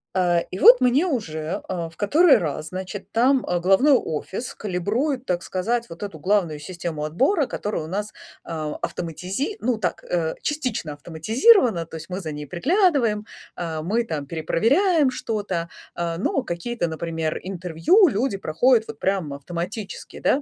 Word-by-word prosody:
Э 175 -2 +3
и 185 - -5
вот 250 +1 +8
мне 255 +7 +4
уже, 165 - -3
э, 170 -3 -3
в 165 - -21
который 300 - +5
раз, 155 -1 -3
значит, 190 +1 -7
там, 255 +3 +3
э, 175 -1 0
головной 195 - +4
офис 190 - -2
калибрует, 225 - -1
так 175 -1 -1
сказать, 230 +6 -2
вот 165 +5 -8
эту 170 -7 -6
главную 180 -4 +1
систему 165 -1 -5
отбора, 270 - +2
которая 205 -9 -3
у - - -7
нас, 205 +4 -4 0.3
а, 155 -2 -4
автоматизи 185 - -3
ну, 245 -3 0
так, 180 -5 -2
э, 165 -2 -1
частично 255 - -2
автоматизирована, 215 - +3
то 165 - -11
есть 160 - -10
мы 185 +2 -3
за 160 -4 -5
ней 150 0 -6
приглядываем, 245 - +2 0.3
э, 160 -2 -4
мы 220 +8 0
там 155 -8 -4
перепроверяем 260 - +2
что-то, 200 -8 -3 0.3
э, 170 -1 -2
но 260 +7 0
какие-то, 175 +1 -3
например, 160 -1 -3
интервью 185 - +3
люди 215 -3 0
проходят 225 +8 +3
вот 225 -1 -8
прям 185 -7 -1
автоматически, 175 +8 -6
да? 280 - +2
190 Hz, 160 wpm, -23 LUFS, 165-245 Hz, 0.3 s, вот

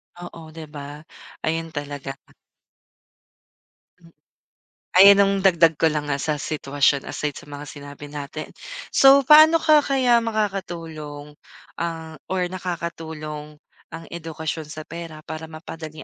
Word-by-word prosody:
Oo, 175 -2 -10
di 165 - -7
ba? 145 +1 -9 0.4
Ayun 165 0 -2
talaga. 145 -2 -5 2.8
Ayun 195 +2 +9
ang 195 0 +2
dagdag 170 -4 +5
ko 160 - +5
lang 150 -1 -2
nga 140 0 -1
sa 150 -1 -1
sitwasyon 140 -1 0
aside 150 -1 -3
sa - - -16
mga 145 0 -8
sinabi 145 0 -10
natin. 145 +1 -6 0.4
So 275 0 +7
paano 310 +3 +8
ka 305 -2 +5
kaya 255 -4 +3
makakatulong 165 -9 -4 0.5
ang 165 -2 -5
or 185 -1 0
nakakatulong 160 -4 -6 0.3
ang 165 +1 -8
edukasyon 160 -2 -5
sa 155 0 -7
pera 165 -2 -9
para 160 0 -7
mapadali 155 -1 -9
160 Hz, 120 wpm, -23 LUFS, 150-180 Hz, 2.8 s, Ayun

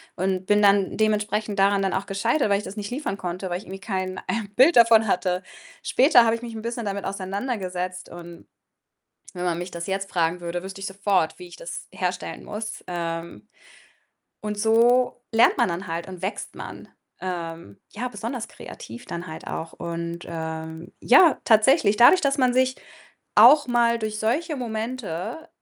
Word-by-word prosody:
und 185 0 -1
bin 205 0 +4
dann 200 -1 +3
dementsprechend 210 -1 0
daran 195 0 +4
dann 195 - 0
auch 190 +1 -1
gescheitert, 225 +5 +1
weil 200 - +3
ich 205 - -5
das 205 - -8
nicht 205 -1 -4
liefern 250 -6 -3
konnte, 180 +1 -4
weil 175 - -1
ich - - -14
irgendwie 190 0 -9
kein, 185 -2 -3
äh, 225 -3 -2
Bild 270 +4 +6
davon 230 -1 +7
hatte. 180 -2 0 0.4
Später 250 -3 +5
habe 225 - +3
ich 230 - -8
mich 235 -2 -7
'n 220 - -6
bisschen 235 -1 -4
damit 200 0 -3
auseinandergesetzt 190 -2 -4
und 170 -1 -11 0.9
wenn 180 - -4
man 170 -2 0
mich 175 +1 -5
das 170 0 -6
jetzt 195 0 -3
fragen 170 0 0
würde, 175 +1 -4
wüsste 195 +1 -8
ich 195 - -4
sofort, 195 -4 0
wie 180 - -9
ich 175 - -12
das 170 - -7
herstellen 180 -1 -4
muss. 215 +1 -6
Ähm 165 - -4 1.0
und 210 -1 -4
so 240 +3 +3
lernt 225 - +5
man - - +3
dann 175 +4 -4
halt 165 +1 -4
und 185 -1 -9
wächst 190 +3 -4
man, - - -9 0.3
ähm, 165 - -6
ja, 245 +4 -4
besonders 230 +1 -5
kreativ 115 +2 -10
dann 170 +1 -6
halt 160 - -9
auch 165 0 -5
und, 170 0 -5
ähm, 160 +1 -6
ja, 320 +5 +6
tatsächlich 220 -1 +4
dadurch, 245 +10 +7
dass 280 0 +1
man 250 -1 +3
sich 260 0 +2 0.6
auch 265 +8 +8
mal 235 -1 +2
durch 215 -1 -3
solche 295 +9 -1
Momente 230 - -5
200 Hz, 180 wpm, -24 LUFS, 180-230 Hz, 1.0 s, auch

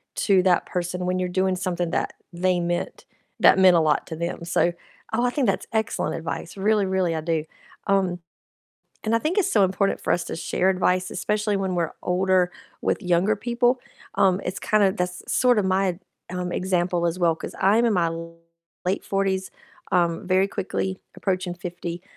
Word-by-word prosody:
to 190 -3 +3
that 180 -2 +3
person 180 0 -3
when 180 0 0
you're 180 - 0
doing 185 +1 +1
something 180 -2 -2
that - - -1 0.2
they 180 +1 +1
meant 175 0 -3 0.3
that - - +6
meant 185 -2 +7
a - - +5
lot 155 -1 +2
to 160 - -5
them, 170 +1 -4
so, 170 0 +2 0.4
oh, 235 +2 +1
I - - +3
think 265 -2 0
that's 195 - 0
excellent 220 -1 -1
advice, 165 +2 -5
really, 205 +1 +2
really 185 -3 0
I 160 - -2
do, 160 -1 -1 0.4
um, 190 -3 +1 0.9
and 220 +1 +1
I - - +4
think 320 - 0
it's 395 - +2
so 205 -3 +5
important 190 +1 0
for - - 0
us 175 - 0
to - - -5
share 180 +3 0
advice, 185 0 +1
especially 210 +2 -1
when 190 -2 -1
we're 170 -2 -1
older, 185 0 +2 0.3
with - - 0
younger 180 +4 +2
people, 240 +3 +1 0.4
um, 195 -1 +3
it's 185 +2 -3
kinda 205 -3 +3
that's 180 -1 -3
sorta 245 -4 +3
my 190 -1 +1 0.3
um, 180 -1 -3
example 180 -2 0
as 170 +1 -1
well 170 -2 +3
'cause - - -7
I'm 210 +5 +4
in 225 - +2
my 170 -2 +2 0.8
late 190 +3 0
40s, 190 -1 -1 0.4
um, 170 0 +1
very 185 +1 +3
quickly 190 -1 -3 0.2
approaching 185 -2 -1
50, 175 -1 -6
185 Hz, 180 wpm, -24 LUFS, 175-195 Hz, 0.9 s, meant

